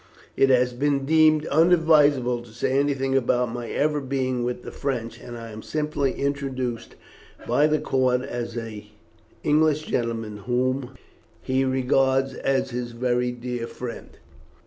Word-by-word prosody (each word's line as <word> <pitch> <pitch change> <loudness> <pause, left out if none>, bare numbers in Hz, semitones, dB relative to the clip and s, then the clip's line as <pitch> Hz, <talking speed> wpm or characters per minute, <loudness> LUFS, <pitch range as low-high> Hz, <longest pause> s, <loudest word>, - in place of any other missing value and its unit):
It 135 - +4
has 125 -1 +3
been 140 +1 0
deemed 155 0 +4
unadvisable 150 -6 +4
to 120 - -14
say 120 - -1
anything 135 -2 0
about 125 -2 +1
my 120 -1 -5
ever 150 0 0
being 130 -2 -1
with 125 0 -3
the - - -7
French, 120 -4 -4
and 120 0 -9
I 115 -1 -8
am 110 0 -8
simply 150 -2 -1
introduced 135 -4 -3 0.5
by 150 - +3
the 155 0 +2
count 130 -3 +1
as 120 -3 -5
an 110 -3 -6 0.6
English 155 0 +3
gentleman 115 -5 -2
whom 125 +4 -1 0.5
he 130 +1 +1
regards 130 0 +2
as 135 -1 -1
his 120 0 -4
very 125 0 0
dear 120 -1 -5
friend. 120 -1 -8
130 Hz, 145 wpm, -24 LUFS, 120-140 Hz, 0.6 s, It